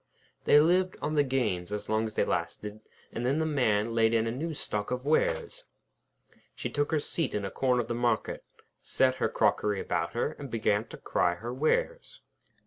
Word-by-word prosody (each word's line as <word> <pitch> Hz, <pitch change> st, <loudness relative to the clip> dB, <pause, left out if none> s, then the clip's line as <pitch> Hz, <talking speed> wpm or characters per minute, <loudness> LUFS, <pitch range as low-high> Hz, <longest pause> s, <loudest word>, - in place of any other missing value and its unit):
They 145 Hz, -, +7 dB
lived 180 Hz, +4 st, +3 dB
on 155 Hz, -, -2 dB
the 145 Hz, -1 st, +4 dB
gains 110 Hz, -9 st, -1 dB
as 105 Hz, 0 st, -4 dB
long 110 Hz, +1 st, +1 dB
as 110 Hz, -, -9 dB
they -, -, +2 dB
lasted, 105 Hz, 0 st, -3 dB, 0.3 s
and 115 Hz, -, -4 dB
then 130 Hz, +4 st, +1 dB
the 160 Hz, -, +1 dB
Man 115 Hz, -7 st, +1 dB
laid 115 Hz, 0 st, +3 dB
in 110 Hz, 0 st, +2 dB
a 115 Hz, -, -1 dB
new 155 Hz, +6 st, -4 dB
stock 105 Hz, -6 st, -2 dB
of 125 Hz, +1 st, -3 dB
wares. -, -, 0 dB, 0.9 s
She -, -, -4 dB
took 145 Hz, -1 st, 0 dB
her 155 Hz, -, +1 dB
seat 150 Hz, -2 st, -1 dB
in 100 Hz, -1 st, -2 dB
a 95 Hz, -, -4 dB
corner 125 Hz, -2 st, +1 dB
of -, -, -12 dB
the 120 Hz, -, -2 dB
market, 120 Hz, -2 st, -1 dB, 0.4 s
set 130 Hz, -, +2 dB
out -, -, -13 dB
her -, -, +1 dB
crockery 105 Hz, -2 st, +1 dB
about 85 Hz, -2 st, -2 dB
her, 120 Hz, +5 st, 0 dB
and 140 Hz, -2 st, -7 dB
began 110 Hz, -2 st, 0 dB
to -, -, -10 dB
cry 85 Hz, -, 0 dB
her 115 Hz, +6 st, -6 dB
wares. -, -, -1 dB
125 Hz, 205 wpm, -29 LUFS, 110-150 Hz, 0.9 s, They